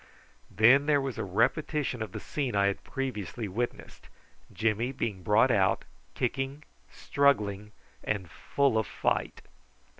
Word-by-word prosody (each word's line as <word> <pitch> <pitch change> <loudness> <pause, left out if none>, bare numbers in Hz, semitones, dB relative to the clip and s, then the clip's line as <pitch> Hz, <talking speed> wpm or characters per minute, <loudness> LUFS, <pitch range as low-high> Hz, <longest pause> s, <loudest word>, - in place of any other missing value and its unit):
Then 130 +6 +5
there 145 -2 +4
was 135 -3 -4
a - - -1
repetition 130 - 0
of 110 -4 -4
the 110 - -6
scene 130 0 -3
I 100 0 +3
had 100 0 -1
previously 110 -5 -4
witnessed, 120 +6 -5 0.4
Jimmy 115 +3 0
being 110 -7 -3
brought 105 +7 +4
out, 95 -3 +2 0.3
kicking, 135 +2 -2 0.3
struggling, 105 -8 +1 0.3
and 100 -4 -2
full 130 - 0
of 110 - -2
fight. - - -2
115 Hz, 130 wpm, -29 LUFS, 100-135 Hz, 0.4 s, Then